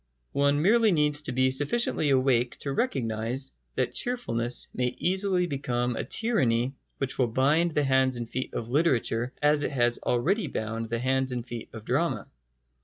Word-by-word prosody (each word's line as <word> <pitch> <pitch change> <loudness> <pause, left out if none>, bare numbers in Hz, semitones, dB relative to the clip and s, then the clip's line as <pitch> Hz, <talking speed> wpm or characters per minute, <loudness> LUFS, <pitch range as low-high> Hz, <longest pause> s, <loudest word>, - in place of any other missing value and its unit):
One 140 +1 +2
merely 225 +3 +4
needs 150 -3 +3
to 150 - -1
be 130 +1 +2
sufficiently 145 - +2
awake 130 -2 +2
to 140 - -3
recognise 130 - 0 0.2
that 125 -1 -1
cheerfulness 120 - -1
may 125 0 -1
easily 185 0 +1
become 125 -5 -2
a - - -2
tyranny 130 - +1 0.2
which 135 -1 -4
will 125 - +3
bind 145 +9 +2
the 150 -2 0
hands 130 -2 +2
and 120 -1 -4
feet 130 +3 -5
of 115 - -3
literature 125 -4 +1
as 150 0 +4
it - - 0
has 120 -3 +1
already 165 - 0
bound 115 -2 -4
the 115 - -1
hands 130 +2 0
and 120 -2 -4
feet 120 -2 -7
of 110 -1 -10
drama. 130 - 0
130 Hz, 170 wpm, -27 LUFS, 120-150 Hz, 0.2 s, merely